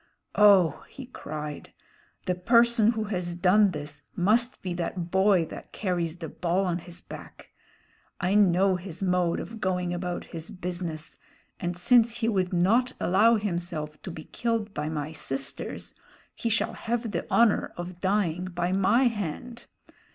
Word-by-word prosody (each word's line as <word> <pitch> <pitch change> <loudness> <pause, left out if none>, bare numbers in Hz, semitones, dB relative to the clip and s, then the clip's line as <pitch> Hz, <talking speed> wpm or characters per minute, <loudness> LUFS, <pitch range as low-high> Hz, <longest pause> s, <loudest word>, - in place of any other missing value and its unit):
"Oh," 195 -7 +5
he 270 - -9
cried. 150 - -7 0.5
"The 180 - +1
person 235 +4 +4
who 220 -1 -2
has 180 -4 -3
done 195 +3 +4
this 150 -3 -7
must 230 +7 +2
be 185 -2 -2
that 175 0 -4
Boy 190 -2 +4
That - - -10
Carries 175 -4 -2
the 165 - -6
Ball 180 +5 -1
on 175 -1 -1
his 175 +1 -8
Back. - - -12 0.7
I 180 +2 0
know 190 -2 +4
his 180 0 -7
mode 180 -2 +1
of 225 -1 -8
going 180 -2 -1
about 175 0 -3
his 165 0 -8
business, 175 -3 -5 0.4
and 175 0 -3
since 235 +4 +4
he 230 - 0
would 190 -5 +1
not 225 +9 +2
allow 215 +6 +4
himself 175 -7 -3
to - - -7
be 160 -2 -8
killed 225 -1 -2
by 150 +1 -3
my 150 -1 -3
sisters, 135 -3 -3 0.4
he 230 - -3
shall 225 - 0
have 235 -1 -3
the 170 - -3
honor 230 -3 +3
of 175 0 -7
dying 185 -3 0
by 175 -1 -2
my 195 +7 +3
hand. 235 +1 -3
180 Hz, 155 wpm, -27 LUFS, 170-215 Hz, 0.7 s, Oh